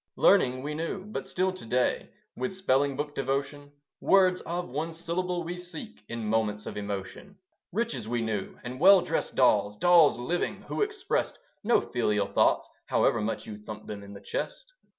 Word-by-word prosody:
Learning 130 -9 +4
we 150 +1 -3
knew; 165 +5 -4
but 215 - -5
still 185 +1 0
to 185 - -10
day, 125 +2 0 0.3
With 130 +9 -3
spelling 140 -6 +2
book 145 0 -3
devotion, 140 +2 -3 0.3
Words 185 -2 +4
of 175 +1 -2
one 155 +6 -3
syllable 175 +1 -2
we 175 +2 -5
seek 175 -10 -9
In 115 -1 -4
moments 105 -1 0
of - - -6
emotion. 100 - -6 0.3
Riches 185 - -2
we 120 0 -1
knew; 105 -3 -3
and 125 +1 -6
well 190 +3 +8
dressed 165 -2 -2
dolls 105 -5 +3
Dolls 170 -1 +6
living 165 +9 -2
who - - -4
expressed 420 -2 -1 0.3
No 235 +3 +4
filial 105 -4 0
thoughts, - - +2 0.2
however 115 - +2
much 110 +2 -3
You 105 -1 -8
thumped 105 0 -9
them 105 -1 -6
in 100 0 -11
the 100 - -10
chest. - - -5
145 Hz, 170 wpm, -28 LUFS, 115-180 Hz, 0.3 s, well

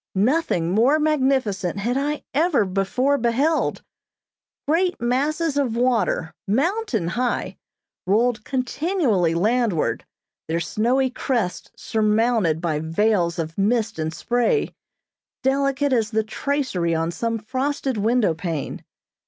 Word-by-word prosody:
Nothing 205 - +1
more 240 +10 +4
magnificent 260 - +1
had 235 +5 -1
I 290 +2 -1
ever 305 - +2
before 200 +9 0
beheld. 270 +8 +1 0.8
Great 355 +4 +1
masses 285 +6 0
of 260 -5 0
water, 235 -9 +1
mountain 265 - 0
high, 245 +6 -2 0.5
rolled 220 +3 +2
continually 255 - 0
landward, 215 -2 +1 0.4
their 165 +1 0
snowy 240 - +1
crests 235 -8 -2
surmounted 220 -6 +1
by 160 -4 -1
veils 170 +2 +1
of 165 +2 -4
mist 225 0 +1
and 155 0 -1
spray, 240 - 0 0.7
delicate 275 +1 +1
as 225 -3 +1
the 220 0 0
tracery 220 - -1
on 165 +1 -1
some 230 +5 -2
frosted 260 +3 -2
window 220 -3 +2
pane. 160 -3 -4
235 Hz, 110 wpm, -22 LUFS, 190-275 Hz, 0.8 s, more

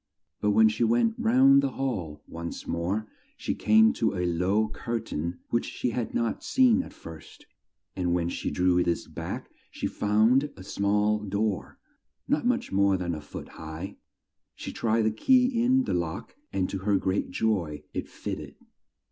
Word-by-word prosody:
But 105 - +1
when 110 +2 +6
she 110 +2 0
went 115 0 +3
round 135 +4 +6
the 140 -1 -1
hall 100 - -3
once 85 0 -6
more 95 +6 -2 0.3
she - - -2
came 220 +2 +5
to 230 - 0
a 90 - 0
low 90 +5 +1
cur 115 +2 -3
tain 85 0 -4
which 120 - 0
she 125 - -2
had 115 0 -3
not 115 -1 -1
seen 255 -1 +4
at - - -10
first, 80 -1 -12 0.5
and 90 -2 -1
when 85 -1 +1
she - - -3
drew 90 -1 +2
this 85 -1 -1
back - - -6 0.2
she - - -5
found 110 +7 +3
a 95 - -9
small 105 +2 +1
door, 105 0 -2 0.5
not 155 - +1
much 250 -1 0
more 100 0 +3
than 90 -1 -2
a 75 - -5
foot 75 - -9
high; 80 +5 -8 0.6
she - - -7
tried 115 0 +1
the 110 - +2
key 250 - +3
in 260 +2 +4
the - - -2
lock, 85 -2 -3 0.2
and 95 -1 0
to 95 - -3
her 100 +1 +2
great 95 +1 -1
joy 90 -7 -1
it - - -4
fit - - -5
ted! - - -10
105 Hz, 175 wpm, -27 LUFS, 90-120 Hz, 0.6 s, when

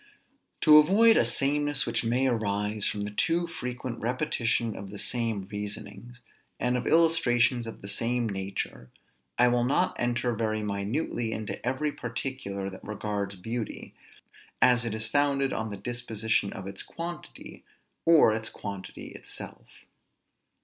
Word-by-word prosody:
To 150 0 +9
avoid 220 +9 +6
a - - +5
sameness 145 0 +1
which 115 0 0
may 120 +3 +1
arise 105 -3 0
from 105 - -2
the 105 0 -3
too 165 +11 +1
frequent 125 -6 -5
repetition 120 -2 0
of 100 0 -7
the 100 - -8
same 115 -4 -2
reasonings, 105 +3 -7 0.4
and 125 0 +1
of 125 - -2
illustrations 125 -7 +3
of 115 - -9
the - - -6
same 115 +3 0
nature, 95 - -4 0.5
I 125 - +6
will 120 0 +2
not 130 +3 +2
enter 120 0 0
very 110 -1 -1
minutely 110 +4 -2
into 105 -2 -5
every 130 +5 0
particular 115 -6 -4
that 95 -1 -8
regards 105 -1 -3
beauty, 115 +4 -5 0.7
as 120 -1 +5
it 110 -2 -2
is 110 0 +1
founded 140 +2 +1
on 110 0 -2
the 100 - -6
disposition 110 -3 -1
of 95 - -7
its 100 0 -6
quantity, 170 +1 -8 0.4
or 160 -9 +6
its 110 0 -1
quantity 100 -2 -7
itself. - - -9
115 Hz, 145 wpm, -28 LUFS, 105-130 Hz, 0.7 s, To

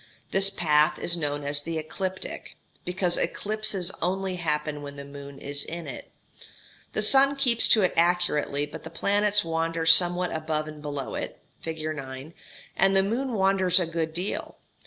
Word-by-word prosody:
This 195 +1 +4
path 150 -5 +3
is 175 - 0
known 145 -3 -2
as 145 0 +1
the 165 +2 -4
ecliptic, 185 +4 -5 0.3
because 180 -1 0
eclipses 210 -4 0
only 190 0 -1
happen 150 -3 -1
when 140 0 -7
the 140 0 -8
moon 140 0 -10
is 140 +1 -2
in 170 0 -6
it. 135 -4 -8 0.8
The 215 - 0
sun 275 +5 +5
keeps 250 -4 +3
to 215 - +6
it 185 - +2
accurately, 165 -4 +2
but 150 - -10
the 160 - -7
planets 205 +4 +1
wander 165 0 -1
somewhat 175 +2 +5
above 155 -1 -2
and 155 -1 -9
below 145 -2 -4
it - - -4 0.2
(fig. 160 -1 -5
9), 135 +2 -8 0.4
and 195 +1 +3
the 190 - +4
moon 240 +6 -1
wanders 190 -2 +3
a 180 - +1
good 165 -1 -2
deal. 180 +5 -4
170 Hz, 165 wpm, -26 LUFS, 150-195 Hz, 0.8 s, to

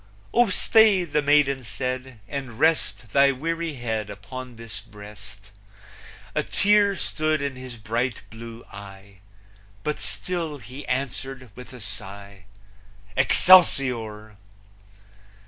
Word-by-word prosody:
"Oh 240 -2 +4
stay," 210 0 +5
the 150 -3 0
maiden 140 -2 +3
said, 125 +1 -5
"and 130 -5 -6
rest 155 -7 +1
Thy 140 0 +6
weary 165 +4 -3
head 110 -4 -3
upon 120 +5 -8
this 115 -1 -7
breast!" 105 -2 -13 0.8
A - - +1
tear 205 -1 +3
stood 155 -1 0
in 140 -1 -3
his 130 -1 -8
bright 115 +2 -2
blue 115 +1 -10
eye, 100 -1 -12 0.6
But 150 - -2
still 170 -5 -2
he 130 +3 -10
answered, 130 -1 -4
with 125 +3 -11
a 125 - -11
sigh, 100 -2 -6 0.7
Excelsior! 125 - +4
130 Hz, 110 wpm, -24 LUFS, 110-150 Hz, 0.8 s, Thy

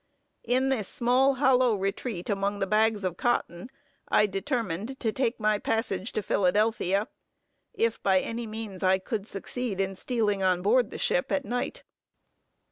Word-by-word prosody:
In 255 +2 +2
this 225 -8 0
small 260 +3 +2
hollow 255 -3 +4
retreat 195 0 -3
among 200 0 -1
the 195 - 0
bags 215 +1 +2
of 180 -2 -2
cotton, 240 -4 -1 0.4
I 210 - +4
determined 215 - -3
to 225 - 0
take 240 0 -1
my 215 -1 +2
passage 225 -3 -1
to 215 - -2
Philadelphia, 205 +1 +1 0.7
if 230 0 0
by 190 -1 +3
any 230 +3 -4
means 215 -3 -7
I 190 0 +4
could 205 +2 -4
succeed 210 +1 -4
in 195 0 0
stealing 210 -1 -1
on 185 -1 +2
board 235 +3 +3
the - - -7
ship 180 - 0
at 195 - 0
night. 245 - -3
215 Hz, 155 wpm, -27 LUFS, 195-240 Hz, 0.7 s, hollow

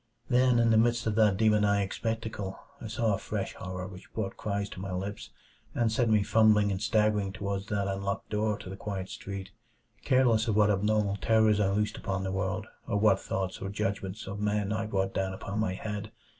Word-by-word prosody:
Then, 125 -1 +4
in 115 -1 +4
the 110 - +5
midst 120 +1 +2
of 110 - +1
that 105 -4 +4
demoniac 105 -2 +3
spectacle, 110 -4 -3 0.2
I 115 - -5
saw 110 0 0
a 100 - -1
fresh - - -3
horror 90 0 -6
which 95 0 -11
brought 100 -3 -2
cries 100 -1 -2
to - - -9
my 95 0 -5
lips 100 +3 -4 0.5
and 115 -2 +2
sent 115 +1 +2
me 105 -2 +4
fumbling 105 0 +4
and 95 0 -2
staggering 105 -2 +2
toward 100 -1 -4
that 100 -2 -1
unlocked 100 0 -3
door 105 0 0
to - - -9
the - - -5
quiet 95 -2 -5
street, 100 -1 -7 0.5
careless 120 -3 +3
of 110 - +1
what 105 -1 +5
abnormal 105 0 +1
terrors 110 -1 +3
I 100 -2 +3
loosed 105 +2 0
upon 95 0 -2
the 95 - -2
world, 95 0 -2 0.2
or 100 - 0
what 100 -2 +4
thoughts 95 -1 -3
or 95 - -3
judgments 100 0 -3
of 100 +1 -6
men 105 0 0
I 110 0 -2
brought 95 -2 -1
down 95 0 -1
upon 100 +2 -4
my 95 -4 0
head. 105 +1 -5
105 Hz, 205 wpm, -29 LUFS, 95-110 Hz, 0.5 s, the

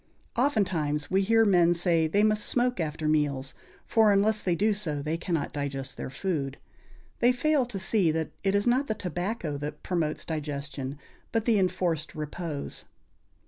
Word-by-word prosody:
Oftentimes 180 - 0
we 190 +1 +3
hear 225 +3 +4
men 175 -4 +4
say 170 -2 +2
they 200 +6 +2
must 215 -1 +2
smoke 245 -2 +1
after 155 -1 -2
meals, 145 -3 0 0.3
for 220 -2 +4
unless 210 +2 +3
they 180 -2 +1
do 210 +5 +2
so 165 -8 -3
they 155 +3 -2
cannot 165 -3 -2
digest 135 -2 -4
their - - -5
food. 140 -3 -3 0.6
They 245 - +5
fail 275 0 +1
to 235 -5 -5
see 190 -2 +2
that 160 0 -1
it 195 0 +2
is 200 - +2
not 255 +4 +2
the 220 - -1
tobacco 180 -4 -3
that 150 +1 -6
promotes 165 -4 -1
digestion, 140 -3 -4 0.3
but 225 -1 0
the 225 -4 +3
enforced 175 -3 0
repose. 155 0 -5
175 Hz, 165 wpm, -28 LUFS, 150-210 Hz, 0.6 s, They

